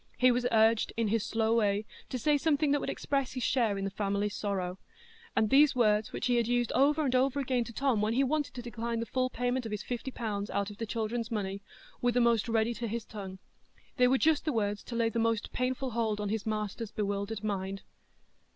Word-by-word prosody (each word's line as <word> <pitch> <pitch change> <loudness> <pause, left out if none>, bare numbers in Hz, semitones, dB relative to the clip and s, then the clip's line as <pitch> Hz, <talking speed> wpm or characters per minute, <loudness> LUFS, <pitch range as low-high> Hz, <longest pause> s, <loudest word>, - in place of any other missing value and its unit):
He 255 +1 +5
was 245 0 +1
urged, 225 0 +4
in 230 -2 +1
his 225 0 +1
slow 225 0 +1
way, 210 -2 +1 0.2
to 255 - -2
say 295 +5 +2
something 295 0 +2
that 290 - +3
would - - -3
express 275 -2 -1
his 255 -2 -3
share 225 -6 +2
in 195 - -3
the 195 - -2
family 200 +1 -1
sorrow; 190 -3 -3 0.6
and 220 - +3
these 285 0 +6
words, 215 -3 +2
which - - -3
he 245 -1 +3
had 235 -1 +1
used 245 -1 +1
over 290 +4 +3
and 260 - 0
over 265 +2 +2
again 255 -3 0
to 235 - -8
Tom 250 -3 +1
when 215 +1 +1
he 265 +3 +3
wanted 285 +1 -1
to 245 - -6
decline 235 0 -3
the 230 - -2
full 255 +1 0
payment 245 0 -1
of - - -7
his 210 - -3
fifty 245 +1 -4
pounds 210 -5 -3
out 200 +1 -1
of 205 - -13
the 225 - -3
children's 225 +1 -2
money, 200 -3 -3 0.4
were 245 - +3
the 245 - +3
most 235 -1 +3
ready 225 +1 +2
to 235 +1 -4
his 225 +1 -4
tongue. 195 -3 -8 0.6
They 250 -1 +5
were 265 +2 +4
just 315 +1 +3
the 305 - -1
words 205 -2 -1
to 240 - -6
lay 230 -1 +2
the 230 - -2
most 225 -1 0
painful 255 +1 -1
hold 220 -2 -1
on 205 -1 -2
his 220 0 -2
master's 215 +1 -3
bewildered 205 0 -3
mind. 195 -2 -3
230 Hz, 235 wpm, -30 LUFS, 210-250 Hz, 0.6 s, these